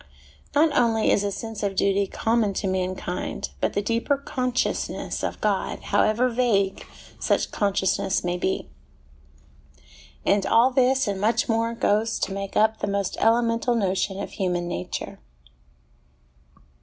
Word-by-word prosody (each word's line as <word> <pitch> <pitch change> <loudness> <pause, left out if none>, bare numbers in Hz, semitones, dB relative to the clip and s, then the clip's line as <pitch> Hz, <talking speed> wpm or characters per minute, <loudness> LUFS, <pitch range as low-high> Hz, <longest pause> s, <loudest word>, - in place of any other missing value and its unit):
Not 305 +1 +4
only 225 -2 +3
is 205 - +2
a 200 - -1
sense 225 +2 -6
of 200 -2 -1
duty 195 +1 +2
common 225 -2 0
to - - -2
mankind, 185 -1 -3
but - - 0
the 205 - -1
deeper 230 +6 0
consciousness 255 -2 -2
of - - -3
God, - - 0
how - - +2
ever 230 +4 +2
vague 230 -6 0 0.3
such - - 0
consciousness 195 -1 0
may 175 0 -1
be. 185 - -2 1.6
And 200 -1 +3
all 235 +3 +5
this 260 0 +3
and 195 -1 -2
much 220 +3 +2
more 230 0 0
goes 220 0 +1
to 195 - -1
make 195 0 -4
up 220 +1 +3
the - - -2
most 200 -1 -1
elemental 230 +1 +2
notion 195 -2 0
of 200 - -5
human 180 -3 -1
nature. 90 - -5
210 Hz, 145 wpm, -24 LUFS, 195-230 Hz, 1.6 s, all